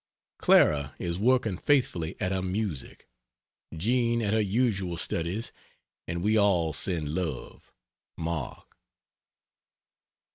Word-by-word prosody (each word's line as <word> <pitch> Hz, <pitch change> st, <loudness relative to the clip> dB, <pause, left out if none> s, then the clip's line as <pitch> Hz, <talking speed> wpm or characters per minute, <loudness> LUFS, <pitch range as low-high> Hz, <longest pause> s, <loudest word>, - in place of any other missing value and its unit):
Clara 70 Hz, -1 st, +4 dB
is 85 Hz, 0 st, -3 dB
working 115 Hz, -4 st, +2 dB
faithfully 95 Hz, -, +1 dB
at 90 Hz, -, -1 dB
her 95 Hz, -1 st, 0 dB
music, 95 Hz, -, -4 dB, 0.6 s
Jean 115 Hz, +7 st, +1 dB
at 105 Hz, 0 st, 0 dB
her 110 Hz, -, +3 dB
usual 100 Hz, -4 st, 0 dB
studies, 90 Hz, +7 st, -2 dB, 0.6 s
and 85 Hz, +1 st, -3 dB
we 110 Hz, +2 st, +3 dB
all 90 Hz, -6 st, +2 dB
send 75 Hz, 0 st, -2 dB
love. 80 Hz, -6 st, -5 dB, 0.5 s
MARK. 80 Hz, -5 st, -5 dB
95 Hz, 105 wpm, -28 LUFS, 85-110 Hz, 0.6 s, Clara